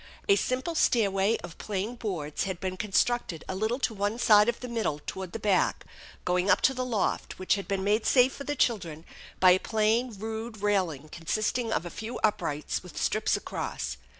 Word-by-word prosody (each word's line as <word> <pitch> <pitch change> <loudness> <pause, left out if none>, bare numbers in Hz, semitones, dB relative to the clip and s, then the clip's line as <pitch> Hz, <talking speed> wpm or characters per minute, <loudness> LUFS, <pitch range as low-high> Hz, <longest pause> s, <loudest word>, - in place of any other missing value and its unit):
A 400 - +6
simple 260 +1 -1
stairway 205 -7 +2
of 175 -1 -9
plain 205 +2 -3
boards 175 -11 -3
had 190 -3 -4
been 185 -1 -3
constructed 205 -3 0
a - - -3
little 220 +5 0
to 255 -4 -1
one 205 +2 -1
side 210 -2 +6
of 240 - -2
the 250 - -6
middle 225 -11 -1
toward 190 -2 -5
the - - -4
back, 205 -4 +1 0.4
going 180 +2 +1
up 185 - +5
to 265 - +4
the 255 -1 -2
loft, 230 -6 -1
which 185 - +1
had 200 -1 -3
been 195 -1 -1
made 210 +3 +1
safe 255 0 +5
for 280 - -7
the 290 +1 -2
children 170 - -1 0.3
by 185 -1 +7
a 185 - +5
plain 220 +4 +1
rude 220 0 -6
railing 180 -8 0
consisting 215 +8 -1
of 175 - 0
a 175 - -6
few 225 +3 -6
uprights 150 -8 0
with - - -9
strips - - +1
across. - - -4
210 Hz, 195 wpm, -28 LUFS, 185-235 Hz, 0.4 s, by